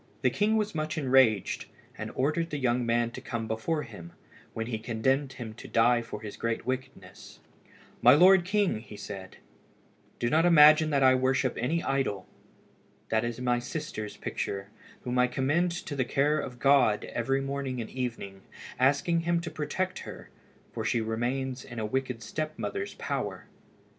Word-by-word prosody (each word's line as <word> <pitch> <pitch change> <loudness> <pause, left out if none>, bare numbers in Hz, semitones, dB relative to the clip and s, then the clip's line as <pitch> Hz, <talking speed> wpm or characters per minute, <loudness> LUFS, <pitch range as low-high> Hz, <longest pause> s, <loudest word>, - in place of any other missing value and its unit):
The - - +4
king 215 +2 +2
was 210 0 -1
much 155 -1 -3
enraged, 130 - +3 0.3
and - - -5
ordered 155 +5 0
the 150 - -3
young 125 -2 +1
man 120 0 +1
to - - -8
come 115 -2 -4
before 130 +8 -1
him, 100 -9 -11 0.4
when 110 - -4
he 115 -2 -3
condemned 130 +5 0
him 115 -3 -7
to 110 - -11
die 120 +1 +3
for 115 -2 -8
his 105 -2 -8
great 115 -1 -2
wickedness. 130 -7 -6 0.6
"My 125 +3 +8
lord 185 +3 +7
king," 190 - 0
said 95 -3 -8
he, - - -22 0.8
"do 120 - -1
not 160 +2 +4
imagine 155 -2 +7
that 140 -2 +2
I 130 0 +7
worship 130 0 +1
any 160 +8 -1
idol. 130 -9 -1 0.8
That 110 0 +1
is 120 0 -3
my 125 -1 +1
sister's 120 -5 -5
picture, 100 +1 -4 0.3
whom 125 0 -1
I 125 - +5
commend 145 +8 +1 0.2
to 145 - -5
the 130 - +1
care 145 +4 +1
of 125 -2 -6
God 135 -5 +4
every 135 +3 -1
morning 135 -2 -3
and 115 - -5
evening, 115 -6 -5 0.4
asking 145 +6 +3
Him 170 +1 +1
to 170 -1 -6
protect 155 +5 -3
her, - - -10 0.4
for 115 - -3
she 115 +2 +1
remains 125 +4 -2
in 120 - -10
a 110 - -2
wicked 125 0 -2
step 155 +6 -4
mother's 405 0 -4
power." - - -4
130 Hz, 170 wpm, -28 LUFS, 115-150 Hz, 0.8 s, My